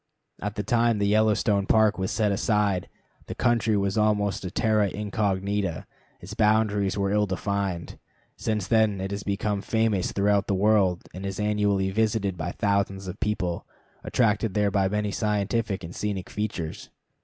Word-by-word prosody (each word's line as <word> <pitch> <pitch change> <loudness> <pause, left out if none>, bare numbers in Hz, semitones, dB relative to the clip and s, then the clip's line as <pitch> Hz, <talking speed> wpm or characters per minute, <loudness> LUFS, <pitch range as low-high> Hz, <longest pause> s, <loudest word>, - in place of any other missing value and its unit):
At 105 +1 -3
the 105 - -2
time 115 +1 +2
the 100 - +1
Yellowstone 105 -1 +2
Park 110 -2 +3
was 95 - -1
set 105 -2 +1
aside, 100 -2 +1 0.4
the - - -5
country 115 -3 +2
was 100 +1 0
almost 105 -2 +1
a 90 - -3
terra 105 0 +2
incognita; 100 -3 -2 0.3
its 95 +4 -9
boundaries 105 -2 +2
were 100 -1 0
ill 105 0 +2
defined. 95 -2 -3 0.4
Since 105 -3 -2
then 110 -2 +2
it 95 +1 -4
has 100 0 -3
become 100 0 -1
famous 110 -3 0
throughout 100 0 +1
the 100 - +1
world, 95 -3 +2
and 95 - -7
is 95 0 -4
annually 105 -2 +1
visited 105 -2 0
by 85 +1 -4
thousands 100 -2 -1
of 95 +2 -7
people, 95 -5 -2 0.4
attracted 110 -3 +1
there 105 -1 +2
by 95 -1 +2
many 105 0 -1
scientific 105 0 -1
and 85 +2 -8
scenic 100 -3 -3
features. 95 -7 -4
100 Hz, 160 wpm, -26 LUFS, 95-105 Hz, 0.4 s, Park